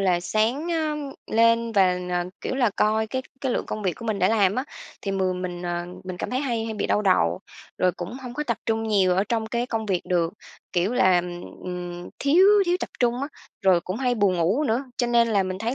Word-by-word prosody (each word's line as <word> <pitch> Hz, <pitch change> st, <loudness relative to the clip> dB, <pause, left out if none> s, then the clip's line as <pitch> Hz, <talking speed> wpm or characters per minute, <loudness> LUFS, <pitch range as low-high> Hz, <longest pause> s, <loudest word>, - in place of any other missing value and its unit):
là 180 Hz, -3 st, +2 dB
sáng 225 Hz, -, 0 dB
á, 320 Hz, -3 st, 0 dB, 0.4 s
lên 230 Hz, +1 st, +3 dB
và, 185 Hz, -3 st, +4 dB
ờ, 175 Hz, 0 st, 0 dB, 0.2 s
kiểu -, -, -3 dB
là, 250 Hz, -4 st, +2 dB
coi 220 Hz, +1 st, +2 dB
cái 260 Hz, +4 st, -3 dB, 0.2 s
cái 265 Hz, -3 st, 0 dB
lượng -, -, -2 dB
công 215 Hz, -, -4 dB
việc 185 Hz, -3 st, +1 dB
của 230 Hz, -, -10 dB
mình 215 Hz, -2 st, -1 dB
đã 185 Hz, -, +3 dB
làm 205 Hz, -3 st, +3 dB
á, 255 Hz, -, -1 dB, 0.4 s
thì 200 Hz, -, -2 dB
mường 185 Hz, -1 st, -1 dB
mình, 175 Hz, -1 st, -5 dB
à, 175 Hz, 0 st, -2 dB, 0.2 s
mình 185 Hz, -1 st, -5 dB
cảm -, -, -4 dB
thấy 255 Hz, +1 st, 0 dB
hay 235 Hz, -5 st, -1 dB
hay 225 Hz, -1 st, -4 dB
bị 210 Hz, -, -1 dB
đau 210 Hz, -, +1 dB
đầu, 90 Hz, -, +2 dB, 0.4 s
rồi 180 Hz, -1 st, +3 dB
cũng 175 Hz, +4 st, -6 dB
hông 245 Hz, -1 st, -7 dB
có 300 Hz, -, -2 dB
tập 235 Hz, -5 st, -1 dB
trung 225 Hz, 0 st, +1 dB
nhiều 200 Hz, -5 st, +3 dB
ở 195 Hz, -, +2 dB
trong 225 Hz, -2 st, 0 dB
cái 235 Hz, +2 st, -1 dB
công 225 Hz, -3 st, -3 dB
việc 185 Hz, -4 st, +1 dB
được, 170 Hz, -2 st, 0 dB, 0.4 s
kiểu, 180 Hz, +5 st, +1 dB
làm, 180 Hz, -5 st, +2 dB, 0.2 s
ừm, 175 Hz, -1 st, -6 dB
thiếu 330 Hz, +7 st, +5 dB, 0.2 s
thiếu 350 Hz, +1 st, +3 dB
tập -, -, -4 dB
trung 245 Hz, +1 st, +1 dB
á, 280 Hz, -, -2 dB, 0.3 s
rồi 185 Hz, -3 st, +5 dB
cũng 185 Hz, +3 st, -5 dB
hay 250 Hz, 0 st, +1 dB
buồn 200 Hz, -4 st, +2 dB
ngủ 190 Hz, -, +2 dB
nữa, 245 Hz, +1 st, 0 dB
cho 245 Hz, -, +1 dB
nên 235 Hz, -1 st, +3 dB
là 205 Hz, -3 st, +3 dB
mình 185 Hz, 0 st, -4 dB
thấy 230 Hz, +4 st, -2 dB
215 Hz, 240 wpm, -24 LUFS, 185-240 Hz, 0.4 s, thiếu